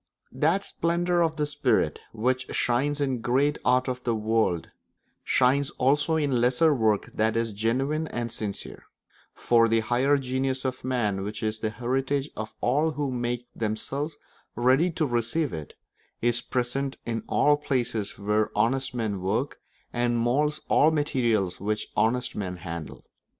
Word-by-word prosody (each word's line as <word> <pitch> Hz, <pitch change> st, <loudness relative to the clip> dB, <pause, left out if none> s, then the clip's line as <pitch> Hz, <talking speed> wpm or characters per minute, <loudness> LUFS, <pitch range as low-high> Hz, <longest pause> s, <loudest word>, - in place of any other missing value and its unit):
That 160 Hz, +9 st, +1 dB
splendour 175 Hz, +1 st, 0 dB
of 160 Hz, -1 st, +1 dB
the 150 Hz, -1 st, 0 dB
spirit 145 Hz, 0 st, +1 dB
which 125 Hz, +3 st, -1 dB
shines 140 Hz, +5 st, +1 dB
in 135 Hz, -3 st, 0 dB
the -, -, -9 dB
great 135 Hz, +5 st, +1 dB
art 125 Hz, +1 st, +3 dB
of 125 Hz, 0 st, -3 dB
the 120 Hz, -2 st, 0 dB
world 110 Hz, -6 st, 0 dB, 0.5 s
shines 135 Hz, +2 st, +3 dB
also 145 Hz, +5 st, +2 dB
in 150 Hz, -3 st, +1 dB
all 125 Hz, -, +2 dB
lesser 125 Hz, +6 st, +4 dB
work 110 Hz, -5 st, +1 dB
that 110 Hz, +1 st, +1 dB
is 115 Hz, -2 st, -1 dB
genuine 135 Hz, +9 st, 0 dB
and 120 Hz, -4 st, -4 dB
sincere; 105 Hz, -3 st, -6 dB, 0.5 s
for 115 Hz, -1 st, +4 dB
the 115 Hz, 0 st, +2 dB
higher 125 Hz, +5 st, +2 dB
genius 130 Hz, 0 st, -2 dB
of 130 Hz, 0 st, -3 dB
man, 115 Hz, -6 st, 0 dB
which 105 Hz, +3 st, -5 dB
is 110 Hz, 0 st, -1 dB
the 110 Hz, -, -1 dB
heritage 135 Hz, +5 st, -1 dB
of 110 Hz, 0 st, -6 dB
all 145 Hz, +6 st, +2 dB
who 145 Hz, -3 st, -2 dB
make 120 Hz, -1 st, -2 dB
themselves 135 Hz, +8 st, -3 dB, 0.4 s
ready 130 Hz, +8 st, +3 dB
to 165 Hz, -2 st, -1 dB
receive 120 Hz, -, -1 dB
it, 80 Hz, -3 st, -7 dB, 0.4 s
is 120 Hz, 0 st, +1 dB
present 135 Hz, +2 st, -2 dB
in 115 Hz, -1 st, -2 dB
all 145 Hz, 0 st, +4 dB
places 120 Hz, -8 st, -2 dB
where 105 Hz, +2 st, +1 dB
honest 130 Hz, +2 st, +1 dB
men 105 Hz, -5 st, -2 dB
work, 110 Hz, +9 st, -1 dB, 0.3 s
and 120 Hz, 0 st, +1 dB
moulds 145 Hz, +6 st, +1 dB
all 150 Hz, -, +5 dB
materials 120 Hz, -, 0 dB
which 105 Hz, +2 st, -2 dB
honest 125 Hz, +3 st, +1 dB
men 95 Hz, -3 st, -3 dB
handle. 85 Hz, -2 st, -7 dB
125 Hz, 155 wpm, -26 LUFS, 110-140 Hz, 0.5 s, all